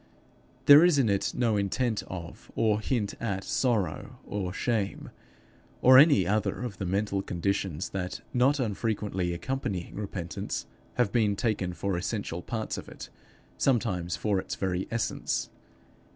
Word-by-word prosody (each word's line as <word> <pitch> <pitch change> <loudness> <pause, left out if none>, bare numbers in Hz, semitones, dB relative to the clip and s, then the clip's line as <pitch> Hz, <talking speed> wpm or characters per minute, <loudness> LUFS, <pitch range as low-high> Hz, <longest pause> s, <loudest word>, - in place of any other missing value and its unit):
There 145 +3 +10
is 175 -4 +5
in 130 -6 +3
it 100 -1 +1
no 115 -4 +2
intent 110 +3 0
of, 85 -3 -8
or 110 -1 +2
hint 110 -5 -1
at 95 -4 -2
sorrow 115 -7 -1
or 95 -3 -3
shame, 105 0 -2 0.7
or 130 +1 +8
any 140 - +6
other 105 +5 0
of 115 -5 -6
the 95 - -2
mental 100 +1 0
conditions 95 -2 -2
that, 90 -1 -4
not 135 +4 +3
unfrequently 105 -5 -1
accompanying 95 -1 -3
repentance, 95 -4 -4 0.3
have 120 -5 +2
been 105 -3 +2
taken 100 -5 -1
for 100 +1 -2
essential 90 -1 -3
parts 110 +3 -3
of - - -10
it, - - -10 0.5
sometimes 100 -10 +1
for 105 -3 0
its - - -4
very 95 -1 -2
essence. 115 -1 -2
100 Hz, 140 wpm, -28 LUFS, 95-120 Hz, 0.7 s, There